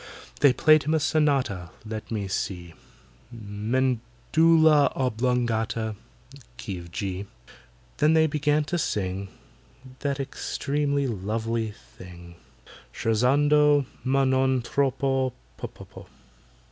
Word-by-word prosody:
They 145 -2 +6
played 155 +4 +5
him 155 +2 0
a - - +2
sonata—let 110 - -1
me 105 -3 -3
see! 90 -3 -4 0.6
"Medulla 125 +8 +2
oblongata"—key 115 -2 -3
of 85 -1 -12
G. 95 +2 -4 0.7
Then 155 +2 +4
they 160 0 +5
began 150 0 +1
to 175 +4 -2
sing 95 - -2 0.7
That 140 -1 -2
extremely 140 +1 -2
lovely 110 +1 -2
thing, 85 - -13 0.6
"Scherzando! 145 +5 +3 0.2
ma 135 +1 +2
non 130 -1 +2
troppo, 135 -1 0 0.3
ppp." - - -10
125 Hz, 90 wpm, -25 LUFS, 105-145 Hz, 0.7 s, They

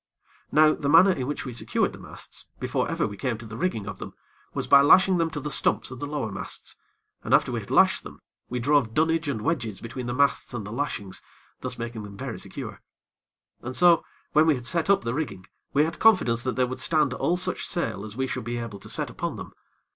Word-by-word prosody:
Now 155 0 +6
the 140 - -2
manner 165 +6 +7
in 130 -8 -2
which 145 - -4
we 125 - -5
secured 115 - 0
the - - -11
masts, - - -9
before - - -1
ever - - 0
we 100 - -5
came 125 -2 -2
to 115 - -10
the 110 0 -8
rigging 115 - -2
of 105 -2 -7
them, - - -8 0.4
was - - -3
by 140 - +7
lashing 185 +5 +6
them 165 -1 +1
to 160 - -5
the 150 +1 -4
stumps 135 - +1
of 130 - -8
the 145 - -4
lower 145 -7 -3
masts, 100 - -6 0.5
and - - +4
after - - +2
we - - -1
had - - -10
lashed - - +4
them, - - -11 0.3
we 125 - -3
drove 125 -2 +2
dunnage 165 +1 +2
and 115 -7 -2
wedges 120 - -1
between 120 +2 -6
the 120 - -2
masts 140 -2 +1
and 105 -4 -4
the 105 - -7
lashings, 115 -7 -4 0.4
thus 125 -1 -5
making 115 -1 -5
them 100 -1 -10
very - - -5
secure. - - -7 0.8
And 130 +1 -6
so, 175 0 +6 0.3
when 155 +1 +4
we 155 - +5
had 125 -2 -7
set 170 +6 0
up 200 - +4
the 115 0 -2
rigging, 130 - -4 0.3
we 145 - +4
had 165 - -5
confidence 175 - +4
that 130 - -1
they 130 - +2
would 130 +1 -5
stand 150 -5 +2
all 175 +7 0
such 180 0 0
sail 135 - -1
as 110 +1 -8
we 130 - 0
should 130 - -4
be 120 +1 -3
able 115 -4 -6
to - - -12
set - - -2
upon - - -4
them. - - -9
130 Hz, 240 wpm, -26 LUFS, 115-155 Hz, 0.8 s, manner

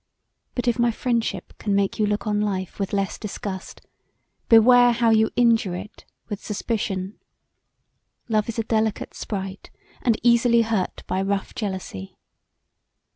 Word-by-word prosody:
But 245 0 -2
if 240 0 +1
my 240 0 +4
friendship 230 -5 -2
can 205 -2 0
make 200 +1 0
you 210 - +3
look 205 0 -1
on 210 -1 0
life 190 -3 -3
with 195 - -2
less 195 -1 -1
disgust, 195 -3 -6 0.7
beware 245 +2 +7
how 230 -1 +3
you 220 0 +4
injure 225 -6 +3
it 200 +4 -9 0.2
with 205 -2 -6
suspicion. 205 -2 -3 1.1
Love 215 -1 +1
is 230 - -4
a 225 - 0
delicate 220 -1 -1
sprite 195 -2 -6 0.3
and 230 -3 +2
easily 235 0 +5
hurt 220 -5 -2
by 185 - -1
rough 195 0 -2
jealousy. 190 - -5
215 Hz, 140 wpm, -23 LUFS, 195-230 Hz, 1.1 s, beware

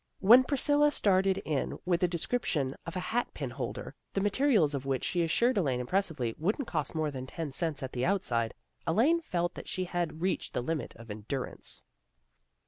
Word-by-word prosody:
When 235 +7 +8
Priscilla 290 +2 +3
started 195 -7 +3
in 150 -4 -1
with 175 0 +1
a 180 - +4
description 165 - -1
of 170 - -5
a - - -1
hat 240 +1 +1
pin - - -4
holder, - - -5 0.2
the 195 - 0
materials 205 - +3
of 135 -2 -2
which, 135 -2 0
she 175 - 0
assured 235 +8 +2
Elaine, 135 -8 +1
impressively, 140 - 0
wouldn't 210 - 0
cost - - -2
more 155 -2 0
than 130 -1 -6
ten 160 +1 -5
cents 155 -1 -1
at 130 - -4
the 125 - -1
outside, 125 - 0 0.3
Elaine 265 - +3
felt 175 - -1
that - - -9
she 185 - -2
had 175 -3 -2
reached 185 - -1
the 120 - 0
limit 155 -3 -3
of 115 -2 -10
endurance. 110 +6 -5
170 Hz, 185 wpm, -30 LUFS, 135-200 Hz, 0.3 s, When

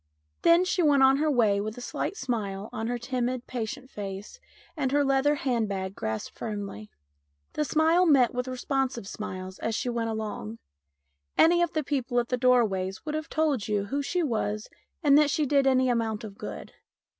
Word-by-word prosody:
Then 340 +2 +5
she 365 0 +1
went 290 -4 +4
on 265 +1 +6
her 305 +2 +1
way 220 -7 +3
with 215 +2 -5
a - - -6
slight 395 - -3
smile 210 -5 -3
on 225 +1 -3
her 245 +1 -1
timid, 250 0 -2
patient 255 +2 -5
face 200 - -7 0.4
and 275 -5 -1
her 285 0 +3
leather 275 +2 +3
hand 240 -6 0
bag 190 -1 -3
grasped 110 - -4
firmly. 200 - -6 0.6
The 300 - 0
smile 320 +4 +3
met 265 -6 +5
with 250 +1 -2
responsive 255 -3 -2
smiles 185 -2 -6
as 225 - -2
she 250 - -2
went 230 -1 -1
along. 210 - -4 0.8
Any 345 +2 +5
of 345 -1 +1
the 310 - 0
people 260 -3 0
at 235 - -2
the 250 - +1
doorways 220 -5 +2
would 305 - -3
have 310 0 -3
told 295 -9 0
you 205 -2 0
who 275 +8 -2
she 350 +5 -1
was 215 -5 -2 0.3
and 290 -1 +6
that 300 -1 +4
she 300 +1 +1
did 275 -1 +3
any 260 -1 +4
amount 225 -3 0
of 205 -3 -8
good. - - -8
250 Hz, 190 wpm, -27 LUFS, 215-285 Hz, 0.8 s, on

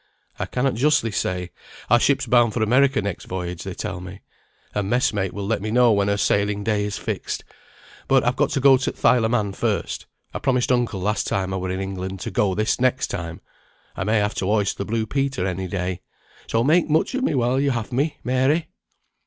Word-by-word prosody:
"I - - -2
cannot 130 +1 0
justly 140 -1 +2
say; 90 -4 -2 0.4
our 120 +1 +5
ship's 135 +2 +2
bound 120 -3 +3
for 115 - +1
America 130 +1 +3
next 100 -3 -4
voyage, 90 -1 -5
they 95 -1 -6
tell 90 0 -5
me. 90 +2 -9 0.5
A 105 - 0
mess 120 +6 +1
mate 95 -3 -1
will 100 -1 -5
let 110 0 -1
me 110 - -3
know 120 +1 +4
when 100 -1 +2
her 100 0 +1
sailing 100 +1 +1
day 105 -1 0
is 105 -1 -3
fixed; - - -4 0.6
but 135 -1 +4
I've 120 +1 +1
got 145 +1 +1
to 140 - +1
go 135 0 +6
to 130 - -2
th' - - -8
Isle 120 -3 +5
o' - - +1
Man 105 -5 0
first. - - -2 0.3
I - - -3
promised 125 -2 +1
uncle 120 -6 0
last 105 +3 0
time 95 -1 -1
I - - -1
were 95 0 -3
in 95 +1 -2
England 95 0 -4
to - - -4
go 95 -3 +1
this 110 +4 0
next 130 0 +1
time. 85 -1 -5 0.5
I - - -2
may 110 +3 +2
have 105 0 +1
to 95 - -1
hoist 105 -1 +1
the 100 - -2
blue 110 +1 -1
Peter 135 -4 -1
any 95 0 -2
day; 90 -1 -3 0.5
so, 115 0 +1
make 160 +5 +3
much 155 - +2
of 260 - -1
me 205 - +1
while 125 +1 +2
you 140 0 +2
have 115 -5 -2
me, 140 +5 0
Mary." 130 +6 +1
110 Hz, 225 wpm, -23 LUFS, 95-125 Hz, 0.6 s, go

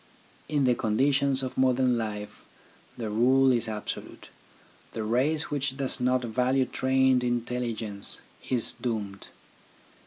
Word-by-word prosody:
In 145 -2 +1
the 125 -1 +4
conditions 135 +4 +1
of 130 - -4
modern 130 -1 +3
life 105 -2 -5 0.5
the 110 -3 -4
rule 130 +4 +4
is 120 -2 +1
absolute, 105 -1 -6 0.6
the 110 - -3
race 135 +9 0
which 140 -2 -2
does 135 -1 +1
not 125 0 +1
value 125 +3 +1
trained 130 0 +2
intelligence 120 -4 -2 0.3
is 125 -3 +2
doomed. 105 -5 -4
125 Hz, 120 wpm, -27 LUFS, 115-130 Hz, 0.6 s, the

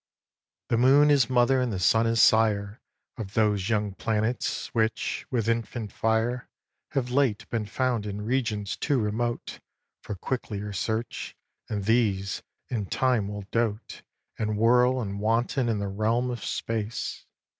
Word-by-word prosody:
xvi. - - -67
The 115 - +2
moon 140 +4 +6
is 135 -4 +4
mother 130 +1 +3
and 125 -2 0
the 100 - -2
sun 110 +5 +3
is 115 0 +1
sire 105 -2 +3 0.4
Of 105 -4 -7
those 105 -2 +2
young 105 -3 0
planets 110 +3 -1
which, 110 -1 -1
with 115 -4 -1
infant 115 -2 -2
fire, 115 +3 0 0.4
Have 130 -3 -1
late 130 -5 +1
been 110 -3 -1
found 120 -1 -1
in 105 +1 -5
regions 110 -5 -1
too 145 -2 0
remote 115 +2 -2 0.4
For 105 - -5
quicklier 105 -2 -4
search; 110 +4 -3 0.3
and 100 -3 -3
these, 100 -4 +1 0.3
in 105 -5 -3
time, 125 -4 +1
will 105 -1 -6
dote 115 -1 -2 0.4
And 105 -1 -1
whirl 125 +3 +4
and 100 -2 -4
wanton 120 +4 +1
in 110 - +1
the 100 0 -2
realms 110 +5 0
of 120 - -5
space. 115 0 -3
115 Hz, 150 wpm, -27 LUFS, 105-120 Hz, 0.4 s, moon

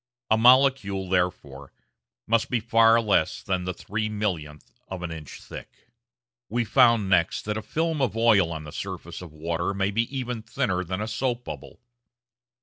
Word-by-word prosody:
A - - +7
molecule, 120 -6 +4
therefore, 75 -7 -2 0.5
must 115 0 +1
be 125 - +1
far 115 0 +4
less 105 -8 +1
than 90 -2 -2
the 90 - -2
three 105 +3 -3
millionth 90 -9 -4
of 95 -2 -6
an 85 - -4
inch 80 -3 -9
thick. - - -12 0.6
We 120 +2 0
found 115 -4 +4
next 90 -2 +2
that 105 0 -2
a 110 - -3
film 160 +6 -2
of 115 -4 0
oil 105 -7 +4
on 80 -2 -5
the 75 - -9
surface - - -6
of 90 -3 -10
water 85 +5 -3
may 100 +1 0
be 115 +3 +1
even 125 -3 -3
thinner 90 -3 -1
than 95 +3 -4
a 110 - -3
soap 125 +1 -2
bubble. - - -9
105 Hz, 170 wpm, -25 LUFS, 90-115 Hz, 0.6 s, A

